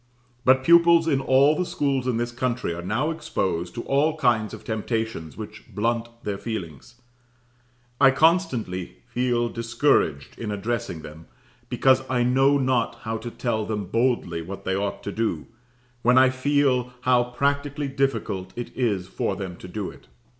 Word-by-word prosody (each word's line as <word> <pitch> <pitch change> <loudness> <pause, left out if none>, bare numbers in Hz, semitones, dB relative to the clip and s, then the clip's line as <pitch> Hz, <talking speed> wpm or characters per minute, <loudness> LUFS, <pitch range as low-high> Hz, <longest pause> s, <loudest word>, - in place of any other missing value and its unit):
But 130 0 +4
pupils 170 +1 +6
in 140 -4 +2
all 135 +3 +4
the 180 - 0
schools 140 -6 -1
in 125 -3 +1
this 120 +1 -2
country 120 -5 -2
are 85 - -6
now 115 - -1
exposed 90 - -2
to 120 - -4
all 150 +3 +1
kinds 120 -7 +2
of - - -9
temptations 110 - -3
which - - -9
blunt 115 +2 0 0.2
their 100 -2 -3
feelings. 95 - -6 1.0
I 135 -1 +7
constantly 135 - +1
feel 120 -1 +1
discouraged 115 - 0
in 115 - -4
addressing 105 -5 -3
them 80 +2 -11 0.4
because 130 -1 +4
I 125 -2 +2
know 135 +3 +4
not 130 -3 +1
how 110 0 -2
to 120 +2 -6
tell 115 -2 -2
them 105 -1 -3
boldly 115 -9 +1
what 95 +4 -8
they 95 - 0
ought 100 +1 -3
to 100 - -4
do, 110 -8 -2 0.6
when 125 +2 +4
I 130 0 +6
feel 130 -2 +1
how 125 -1 +3
practically 140 +3 -1
difficult 115 -9 -2
it 120 - -6
is 105 -8 0
for 95 - -2
them 95 -3 -6
to - - -10
do 100 +1 -4
it. - - -18
120 Hz, 160 wpm, -24 LUFS, 105-135 Hz, 1.0 s, I